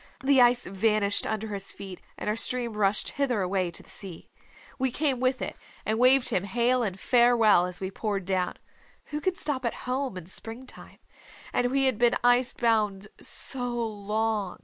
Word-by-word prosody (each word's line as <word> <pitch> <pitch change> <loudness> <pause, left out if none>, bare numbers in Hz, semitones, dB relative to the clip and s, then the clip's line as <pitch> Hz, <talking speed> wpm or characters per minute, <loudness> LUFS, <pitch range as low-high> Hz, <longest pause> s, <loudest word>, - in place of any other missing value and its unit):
The 270 -1 +4
ice 245 0 +4
vanished 205 +1 0
under 220 0 -3
his 200 -1 0
feet, 190 -2 -10 0.2
and - - -6
our 210 - +1
stream 240 0 0
rushed 205 -1 0
hither 255 -7 -1
away 185 -1 -1
to 170 - -8
the - - -18
sea. 185 -5 -9 0.5
We 265 0 +2
came 270 0 -1
with 255 +1 0
it, - - -5 0.3
and 220 +1 -1
waved 255 +1 +5
him 185 - 0
hail 240 +5 +1
and 195 -5 -3
farewell 235 -7 +4
as 180 0 -4
we 190 0 -4
poured 200 -3 -3
down. 185 -1 -1 0.5
Who 300 0 -3
can 370 +2 0
stop 285 -6 0
at 235 - -2
home 255 -4 -2
in 180 - -8
spring 225 +7 -6
time? - - -12 0.6
And 245 - +1
we 270 +1 +1
had 255 -5 0
been 240 0 +3
ice 245 +1 +4
bound 210 -4 0
so 250 -2 +4
long!" 215 -2 -2
225 Hz, 185 wpm, -27 LUFS, 200-250 Hz, 0.6 s, waved